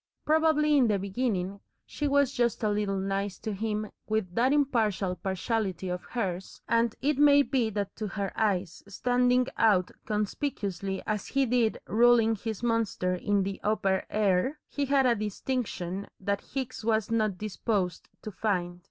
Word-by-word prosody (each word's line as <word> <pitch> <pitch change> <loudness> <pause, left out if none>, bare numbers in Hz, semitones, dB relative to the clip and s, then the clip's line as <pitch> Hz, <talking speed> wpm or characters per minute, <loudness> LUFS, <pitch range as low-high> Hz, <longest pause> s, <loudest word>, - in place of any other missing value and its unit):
Probably 305 -1 +3
in 255 -4 +5
the 210 -2 +2
beginning 195 -1 -2 0.3
she 295 - -3
was 280 -1 +3
just 240 -4 0
a 215 - +2
little 205 -1 0
"nice" 195 0 -2
to 215 - -4
him 215 +1 -3 0.2
with 215 -5 -1
that 245 +6 +3
impartial 225 -10 +1
partiality 190 +1 -2
of 180 0 -3
hers, 190 -6 -4
and 230 -1 +2
it 285 0 +1
may 285 -1 +7
be 255 -5 0
that 200 -2 -3
to 215 - -3
her 200 -1 -3
eyes, 190 -5 0
standing 250 +4 +2
out 200 -5 +3 0.2
conspicuously 200 -3 -2
as 210 -2 -2
he 275 -1 +1
did 235 -2 +1
ruling 230 0 +4
his 220 +1 -5
monster 230 -6 0
in 200 +2 +1
the 195 0 -4
upper 195 -3 +1
air, 210 +6 +1
he 285 - -2
had 275 -1 +3
a 245 - +5
distinction 210 -3 -3
that 200 +1 -1
Hicks 255 -4 -3
was 220 -1 +1
not 215 -4 +1
disposed 200 -3 -2
to 215 - -5
find. 180 -4 -2
215 Hz, 160 wpm, -28 LUFS, 195-245 Hz, 0.3 s, may